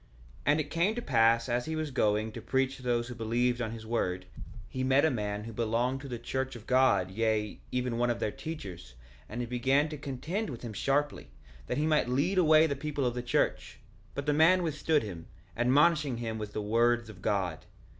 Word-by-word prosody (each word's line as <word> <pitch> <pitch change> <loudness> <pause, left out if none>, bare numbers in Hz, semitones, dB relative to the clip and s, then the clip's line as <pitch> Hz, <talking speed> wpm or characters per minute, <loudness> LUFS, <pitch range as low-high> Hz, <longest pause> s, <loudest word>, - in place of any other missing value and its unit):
1:7 - - -29 0.4
And 145 +2 +4
it 150 -1 -3
came 175 +6 +1
to 240 - -3
pass 115 - +3
as 120 0 0
he 160 - -3
was 155 -2 -3
going, 110 -3 +1
to 115 - -8
preach 130 +3 0
to - - -13
those 120 -1 0
who 125 - -6
believed 120 +2 0
on 110 - -1
his 110 0 -8
word, 90 -5 -1 0.4
he 130 +1 -4
met 135 +3 +4
a 160 - +3
man 105 -3 -3
who 115 +1 -8
belonged 120 +4 0
to 140 - -8
the 125 -3 -4
church 130 +2 -3
of 115 -2 -11
God, 120 -9 +3
yea, 110 0 -1
even 125 -2 -1
one 120 0 +2
of 120 - -1
their 105 - -1
teachers; 95 - -8 0.3
and 120 +4 -4
he - - -2
began 135 +5 +1
to 150 -2 -7
contend 155 - -3
with 125 -4 -7
him 115 -3 -5
sharply, 140 - -1 0.4
that - - -2
he 150 - +1
might 155 -5 +2
lead 160 +10 +1
away 155 -2 +6
the 140 -3 -1
people 145 -1 -2
of 120 - +1
the 125 - -3
church; 125 0 -1 0.4
but 140 - -3
the 150 - +2
man 170 +5 +5
withstood 155 -1 +1
him, 90 -6 -7 0.3
admonishing 145 +2 +3
him 115 -2 -4
with 105 -1 -6
the 105 - -3
words 120 +2 +2
of 105 -5 -12
God. 95 -6 -1
125 Hz, 220 wpm, -30 LUFS, 110-145 Hz, 0.4 s, away